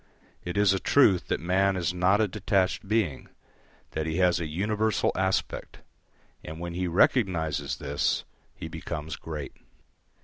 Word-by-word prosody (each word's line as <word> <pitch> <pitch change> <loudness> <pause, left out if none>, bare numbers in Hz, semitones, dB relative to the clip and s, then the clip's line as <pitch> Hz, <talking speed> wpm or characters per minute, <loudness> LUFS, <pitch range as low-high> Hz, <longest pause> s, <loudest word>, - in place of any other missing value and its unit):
It 90 +2 -4
is 100 -1 +4
a 95 - 0
truth 100 -9 +4
that - - -1
man 95 +3 +2
is 85 -2 -1
not 90 +4 +3
a 110 - +3
detached 100 0 0
being, 100 -10 -1 0.6
that 80 0 -3
he 80 +1 -2
has 90 -2 +3
a 85 - -3
universal 105 +6 0
aspect; 95 0 -2 0.6
and 80 +1 -8
when 85 0 -5
he 90 +1 -2
recognises 85 - +1
this 70 +1 -1 0.3
he - - -7
becomes 75 +2 -5
great. 75 -3 -7
90 Hz, 145 wpm, -27 LUFS, 80-100 Hz, 0.6 s, is